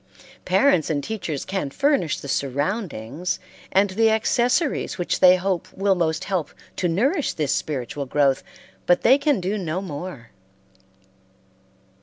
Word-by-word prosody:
Parents 270 - +3
and 145 -3 -1
teachers 180 -10 -4
can 190 -7 -2
furnish 265 - +1
the - - -8
surroundings 145 - -2 0.3
and 195 +1 +3
the 225 +3 +3
accessories 240 +7 +1
which 175 - -1
they 180 -1 +8
hope 185 -1 -2
will 195 0 +2
most 160 -3 -1
help 185 -6 -3 0.2
to 180 - +1
nourish 270 - +1
this 150 -3 0
spiritual 140 -1 -3
growth, 135 -1 +2 0.5
but 175 - +3
they 265 +4 +6
can 280 -5 +2
do 195 +4 -2
no 170 -1 -2
more. 150 -8 -7
180 Hz, 135 wpm, -23 LUFS, 145-210 Hz, 0.5 s, they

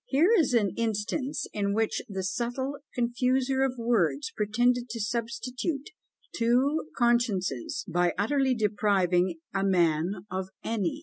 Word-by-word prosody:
Here 315 +9 +4
is 305 - +3
an 205 -5 +3
instance 230 +6 -1
in 200 -1 0
which 225 0 0
the 190 -2 -3
subtle 245 +7 -2 0.2
confuser 255 +2 +1
of 260 -1 -1
words 200 - +1
pretended 240 +3 +1
to 230 +1 -5
substitute 245 +6 -3 0.4
two 255 +6 +2
consciences, 230 - +1
by 175 +1 +1
utterly 265 +5 +2
depriving 190 -5 +2 0.2
a 195 0 0
man 180 0 +1
of 185 0 -3
any! 205 -7 -1
230 Hz, 125 wpm, -28 LUFS, 195-250 Hz, 0.4 s, Here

